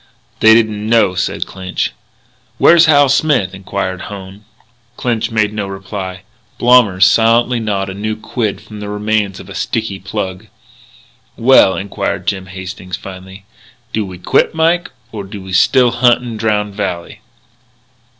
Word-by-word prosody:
"They 110 0 +7
didn't 110 -2 0
know," 115 -5 +3
said 90 - -2
Clinch. 95 -1 -4 0.7
"Where's 170 -1 +6
Hal 145 -2 +5
Smith?" 135 -8 +1
inquired 95 -1 -4
Hone. 100 0 -10 0.5
Clinch 120 -3 -1
made 110 -2 0
no 105 -2 -3
reply. 95 -1 -6 0.3
Blommers 115 -7 +5
silently 115 +4 +3
gnawed 100 -3 -2
a 95 - -5
new 110 +2 -3
quid 110 -1 -3
from 105 -1 -11
the 105 0 -6
remains 105 -1 -1
of - - -11
a - - -9
sticky 110 -4 -3
plug. 95 0 -5 0.9
"Well," 115 -6 +5
inquired 100 -1 -3
Jim 95 -2 -2
Hastings 95 -1 -7
finally, 95 +1 -11 0.5
"do 110 - 0
we 95 -2 -8
quit, 90 - +1
Mike, 165 +2 +1 0.2
or 105 -3 -6
do 100 +1 -9
we 95 -1 -9
still 125 +6 +4
hunt 120 0 +3
in 120 -2 -6
Drowned 105 -2 -1
Valley?" 100 +1 -4
105 Hz, 145 wpm, -15 LUFS, 95-115 Hz, 0.9 s, They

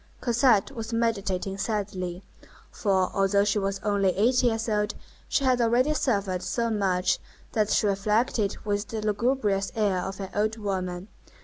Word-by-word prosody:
Cosette 235 -3 +3
was 225 0 -6
meditating 200 -4 -1
sadly; 195 -4 -3 0.5
for, 190 -3 +1
although 195 +1 +3
she 205 +1 +1
was 195 0 -2
only 200 -2 +2
eight 245 +5 +3
years 225 -2 +1
old, 210 -1 0 0.3
she 275 - +1
had 255 -2 +3
already 245 +6 +3
suffered 200 -10 0
so 235 +2 -1
much 190 -4 +1 0.3
that 215 -2 +1
she - - +2
reflected 210 +1 +1
with 205 0 -1
the 220 - -4
lugubrious 210 -3 0
air 205 -4 +1
of 190 +2 -5
an 195 -1 -5
old 215 +2 0
woman. 185 -3 -3
205 Hz, 150 wpm, -26 LUFS, 195-230 Hz, 0.5 s, Cosette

